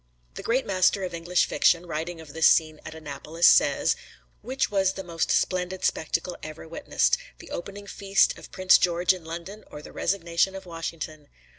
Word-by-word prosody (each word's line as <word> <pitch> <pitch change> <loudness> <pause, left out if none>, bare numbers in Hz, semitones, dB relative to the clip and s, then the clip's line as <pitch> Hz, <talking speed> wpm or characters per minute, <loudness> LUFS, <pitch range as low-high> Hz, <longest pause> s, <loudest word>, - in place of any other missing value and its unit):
The - - -7
great 255 +3 0
master 190 0 +2
of 180 -1 -4
English 175 +1 +1
fiction, 175 0 +2
writing 165 +1 -4
of 155 -3 -12
this 160 0 +4
scene 155 -2 +3
at 160 - -9
Annapolis, 160 +2 -3
says: - - +5 0.5
"Which 260 -2 -2
was 190 -2 +2
the 195 - -6
most 170 -2 -2
splendid 185 0 0
spectacle 170 +3 -1
ever 155 +1 -9
witnessed 475 - +1 0.2
the - - -13
opening 200 +3 -7
feast 195 -1 +2
of - - -13
Prince 185 0 +5
George 175 +1 +2
in 180 -2 -9
London, 170 +6 -7
or - - -9
the - - -11
resignation 175 0 0
of 190 - -8
Washington? 165 -3 -6
175 Hz, 175 wpm, -26 LUFS, 160-190 Hz, 0.5 s, says